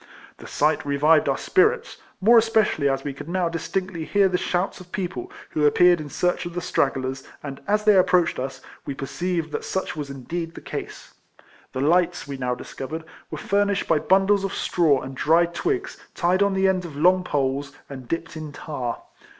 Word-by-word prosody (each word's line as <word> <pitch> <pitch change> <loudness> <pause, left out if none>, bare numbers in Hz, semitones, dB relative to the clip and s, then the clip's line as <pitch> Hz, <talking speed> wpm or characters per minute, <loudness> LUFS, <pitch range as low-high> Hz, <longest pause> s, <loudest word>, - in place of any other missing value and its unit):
The - - -11
sight 150 +1 +1
revived 145 +2 +3
our 135 - +1
spirits, 430 +5 +2 0.2
more 230 +4 +7
especi 220 -5 +2
ally 140 - +2
as 135 0 -2
we 145 - -4
could 140 +4 -9
now 180 -1 0
distinctly 170 +1 -3
hear 200 +4 +3
the 180 - -1
shouts 180 +3 -1
of 180 -1 -14
people, 175 -10 -4 0.2
who 150 - -1
appeared 175 +3 +5
in 150 - -7
search 180 +3 0
of 175 - -9
the - - 0
stragglers, 135 -5 -1 0.2
and 140 -2 -7
as 210 +1 +2
they 210 -1 +5
approached 180 -4 +3
us, 130 +1 -5 0.2
we 140 - -5
perceived 165 +4 -3
that - - -3
such 190 - -3
was 145 -2 -5
indeed 165 +5 -5
the - - -7
case. - - -7 0.6
The 130 - -2
lights, 175 +1 +2
we 140 - -5
now 125 -2 -2
discovered, 155 +6 -7 0.3
were 155 - -5
fur 200 +6 +1
nished 200 -1 -1
by 155 - +3
bundles 195 +3 +3
of 195 - -3
straw 155 -6 +2
and 135 - -7
dried 170 +5 +2
twigs, 380 - -2 0.2
tied 180 +2 +2
on 200 -1 +3
the 190 0 +3
ends 185 -1 +1
of 150 - -11
long 180 +5 +4
poles, 140 -2 -1 0.2
and 130 -3 -9
dipped 165 +2 -4
in 155 -1 -6
tar. 130 -7 -5
165 Hz, 200 wpm, -24 LUFS, 140-185 Hz, 0.6 s, more